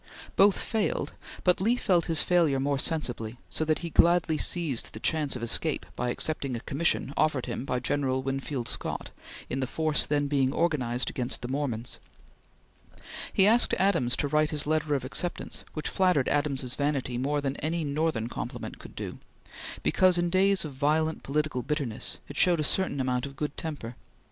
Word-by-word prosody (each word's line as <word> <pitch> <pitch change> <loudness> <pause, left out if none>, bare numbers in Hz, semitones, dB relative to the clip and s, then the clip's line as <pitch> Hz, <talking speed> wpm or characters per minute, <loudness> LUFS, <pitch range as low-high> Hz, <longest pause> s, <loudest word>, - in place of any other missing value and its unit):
Both 200 0 +5
failed, 220 -3 -1 0.3
but 180 0 +3
Lee 230 +5 +3
felt 180 -8 +2
his 165 -2 +2
failure 165 -6 +3
more 140 0 0
sensibly, 120 -8 -1
so - - 0
that 155 0 +1
he 170 - -5
gladly 170 -1 +4
seized 155 -4 0
the 110 - -7
chance 150 +1 0
of 120 - -5
escape 115 - 0
by 125 - -1
accepting 140 0 -2
a - - -3
commission 140 -1 0
offered 145 -5 +1
him 130 - -4
by 125 - -1
General 130 0 0
Winfield 135 -2 -3
Scott - - -3 0.4
in 130 - -3
the 130 - -1
force 155 +1 +1
then 145 -1 +1
being 135 -2 +1
organized 130 -8 0
against 125 -1 -3
the - - -3
Mormons. 130 -4 -2 1.3
He 195 - +4
asked 230 +4 +5
Adams 125 -11 +2
to 145 - 0
write 150 +1 +2
his 150 -1 0
letter 155 -1 +1
of 130 -2 -2
acceptance, 175 +6 -3
which 155 - -3
flattered 180 -8 +2
Adams's 140 -4 0
vanity 140 -4 -1
more 145 +3 0
than 140 -1 -2
any 160 +2 -1
Northern 145 -5 0
compliment - - -6
could - - -12
do, - - -6 0.6
because, 185 -1 +4
in 175 0 +1
days 195 0 +4
of 150 - -6
violent 155 +4 +1
political 150 -2 -1
bitterness, 140 -6 -2
it - - -9
showed 175 -3 +4
a - - +1
certain 155 -2 +1
amount 130 +1 0
of 140 - -11
good 150 0 -3
temper. 145 -7 -6
145 Hz, 180 wpm, -28 LUFS, 130-165 Hz, 1.3 s, Both